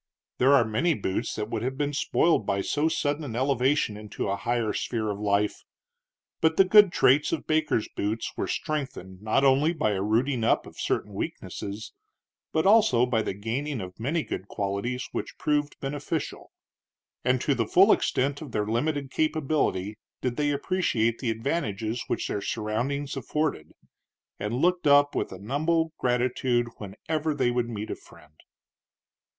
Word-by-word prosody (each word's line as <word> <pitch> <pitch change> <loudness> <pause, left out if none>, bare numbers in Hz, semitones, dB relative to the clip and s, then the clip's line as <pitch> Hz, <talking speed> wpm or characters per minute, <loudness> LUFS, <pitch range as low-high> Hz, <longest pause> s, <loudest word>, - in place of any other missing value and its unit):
There 135 +3 +6
are 120 - +5
many 145 +10 +1
boots 100 +1 -2
that 105 0 -4
would - - -2
have 130 +2 -3
been 145 0 -1
spoiled 160 -1 +2
by 100 0 0
so 145 +9 0
sudden 155 -1 -1
an 125 -6 -5
elevation 130 -2 +1
into 105 -1 -5
a 100 - +1
higher 115 +1 -1
sphere 110 -3 -2
of 100 - -5
life; 105 0 0 0.8
but 160 0 +3
the 195 - +7
good 205 0 +7
traits 140 -1 +4
of 165 - -2
Baker's 155 -8 +1
boots 110 +3 -2
were - - -2
strengthened 130 -11 -4
not 110 +6 +1
only 140 +4 +4
by 110 -10 0
a 95 -2 -1
rooting 115 +4 +1
up 115 - +2
of - - -13
certain - - -1
weaknesses, 105 +2 -5 0.6
but 160 - +1
also 195 - +5
by 120 -3 +1
the 100 - -3
gaining 125 +7 -3
of 90 -1 -8
many 150 +8 0
good 95 - -5
qualities 105 +7 -3
which - - -5
proved 150 -1 0
beneficial; 145 +3 -4 0.7
and 125 0 +2
to 145 - +2
the 115 -4 -1
full 195 - +6
extent 140 +3 +1
of 145 -7 -8
their 105 -1 0
limited 135 +5 -1
capability 150 - 0 0.2
did 125 -2 -2
they 145 +1 +1
appreciate 140 - 0
the 125 - -2
advantages 115 - -2
which - - -1
their 100 - -2
surroundings 120 +8 -2
afforded, 135 - -2 0.7
and 105 +3 -2
looked 175 +4 +2
up 145 0 +5
with - - -1
humble 155 - -1
gratitude 125 -1 +1
whenever 150 +10 -3
they 130 -3 +2
would 120 -1 -1
meet 110 -2 -5
a - - -2
friend. - - -18
125 Hz, 165 wpm, -27 LUFS, 110-150 Hz, 0.8 s, the